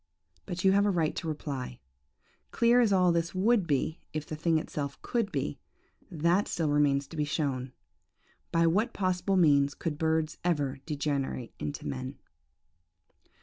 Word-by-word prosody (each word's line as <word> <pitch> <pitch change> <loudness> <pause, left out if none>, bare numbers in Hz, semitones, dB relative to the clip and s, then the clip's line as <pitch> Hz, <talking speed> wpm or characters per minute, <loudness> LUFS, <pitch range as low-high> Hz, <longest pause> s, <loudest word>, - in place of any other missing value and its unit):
But 180 +1 -4
you 190 - +6
have 200 +1 +4
a - - +3
right 165 -5 +1
to 165 - -4
reply. 140 - -4 0.7
'Clear 235 +1 +4
as 225 -4 +3
all 180 -2 +4
this 170 +1 -1
would 205 0 +3
be 150 +2 0
if 155 -1 -3
the 155 - -5
thing 165 +1 +1
itself 145 -2 -4
could 230 -5 -1
be, 135 - -2 0.5
that 170 +5 +1
still 160 -3 -1
remains 145 -1 +3
to - - -9
be 150 - +1
shown. 140 -4 -2 0.8
By 165 0 +3
what 210 +9 +2
possible 185 0 0
means 145 -4 +4
could 155 -3 -4
birds 160 0 0
ever 145 -6 0
degenerate 140 -5 -2
into 145 - -5
men?' 130 0 -5
160 Hz, 155 wpm, -29 LUFS, 145-180 Hz, 0.8 s, you